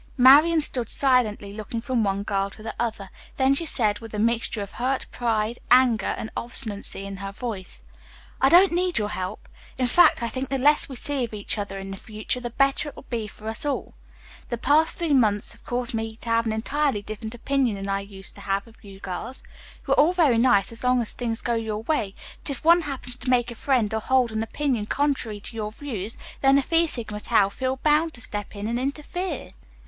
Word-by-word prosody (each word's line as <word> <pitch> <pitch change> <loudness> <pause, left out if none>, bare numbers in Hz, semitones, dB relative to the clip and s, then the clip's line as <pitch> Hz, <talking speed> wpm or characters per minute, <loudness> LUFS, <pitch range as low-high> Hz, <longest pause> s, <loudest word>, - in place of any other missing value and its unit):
Marian 295 +6 +7
stood 245 -6 0
silently 230 -7 +2
looking 215 +2 -5
from 240 -1 0
one 200 0 0
girl 195 -1 -1
to 215 +2 -12
the 220 - -4
other, 220 -5 -3 0.3
then 265 0 +4
she 325 +4 -1
said 215 -7 +2
with 225 -2 -9
a - - -3
mixture 225 -1 0
of 200 - -9
hurt 260 +2 -1
pride, 225 -1 -1
anger 245 -4 +4
and 220 - -6
obstinacy 210 -5 -3
in 195 0 -6
her 195 +1 -5
voice: 200 -3 -6 0.6
"I 270 - +6
don't 360 +4 +7
need 360 +1 0
your 210 -1 0
help. 185 +1 -5 0.3
In 255 - +1
fact, 245 0 +5
I - - 0
think 260 +3 -4
the 270 - 0
less 290 +3 +3
we 265 - -7
see 280 +1 -2
of 225 -2 -4
each 205 - -2
other 200 -1 -4
in 195 0 -6
future 215 +5 -4
the 245 -1 -4
better 275 +4 +1
it - - -14
will - - -12
be 225 -3 -2
for 215 +1 -11
us 220 0 -3
all. 290 -1 -2 0.6
The 240 - -2
past 295 +7 +3
three 330 -4 0
months 210 -6 +3
have - - -10
caused 245 +1 -1
me 225 0 -3
to 230 - -9
have 230 0 +2
an - - 0
entirely 265 0 0
different 215 +2 -6
opinion 260 -2 0
than 195 0 -5
I 195 0 0
used 200 -1 -8
to - - -13
have 195 0 -1
of 230 -1 -20
you 195 -1 -12
girls. 190 +8 -5 0.4
You - - +3
are - - +3
all 320 +5 +5
very 300 -10 +4
nice 230 -5 +3
as 230 - -9
long 250 0 +3
as 220 - +3
things 230 -2 -3
go 240 - 0
your 220 -2 -2
way, 220 -8 -1 0.3
but - - -4
if 280 +1 -5
one 340 +1 +7
happens 265 -5 -2
to 250 - -4
make 240 -1 +2
a - - -5
friend 235 -3 0
or 220 - -1
hold 255 -1 +2
an 220 0 -2
opinion 235 -2 -1
contrary 265 -7 -1
to 225 - -9
your 210 -1 -3
views, 225 -5 -5 0.2
then 270 0 +5
the 280 - +4
Phi 330 +4 +3
Sigma 220 -7 -3
Taus 205 -3 +2
feel 260 +3 -1
bound 310 +2 +3
to 245 - -7
step 205 -2 -4
in 205 0 -5
and 235 +2 -1
interfere. 300 +4 -3
235 Hz, 225 wpm, -25 LUFS, 210-270 Hz, 0.6 s, Marian